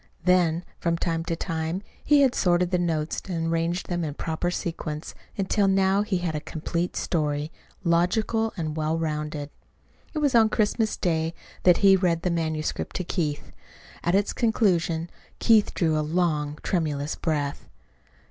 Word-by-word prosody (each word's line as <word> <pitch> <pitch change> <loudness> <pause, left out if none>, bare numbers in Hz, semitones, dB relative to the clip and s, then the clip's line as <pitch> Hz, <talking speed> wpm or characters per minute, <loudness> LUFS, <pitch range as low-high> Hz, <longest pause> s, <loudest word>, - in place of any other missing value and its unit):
Then, 180 -2 +3
from 170 -1 0
time 165 -1 -1
to 165 - -1
time 165 +2 -3 0.2
he 290 -1 +5
had 260 -2 +3
sorted 175 -1 +2
the 180 - +2
notes 160 -3 -1
and 165 -2 -1
arranged 170 +2 -1
them 175 -1 -1
in 150 -3 -3
proper 160 +2 -2
sequence, 160 -3 -4 0.2
until 195 +1 +2
now 195 +1 +3
he 210 -2 0
had 175 -2 -2
a 150 - -1
complete 170 +3 -3
story, 150 -1 -1 0.3
logical 215 +6 +2
and 155 -3 -3
well 155 +1 0
rounded. 150 -2 -3 0.6
It - - -1
was 290 -3 +2
on 225 -2 +6
Christmas 215 0 +1
Day 165 -1 0 0.3
that 180 -2 +7
he 195 -1 +8
read 175 -3 +1
the 180 - +1
manuscript 160 -2 -2
to 185 - -1
Keith. 155 -5 -2 0.5
At 175 +2 +2
its 200 +1 +2
conclusion 175 -8 +1 0.3
Keith 220 -3 +4
drew 160 -3 +2
a - - +2
long, 150 -2 0
tremulous 150 -4 -1
breath. 145 -3 -2
170 Hz, 155 wpm, -26 LUFS, 160-185 Hz, 0.6 s, he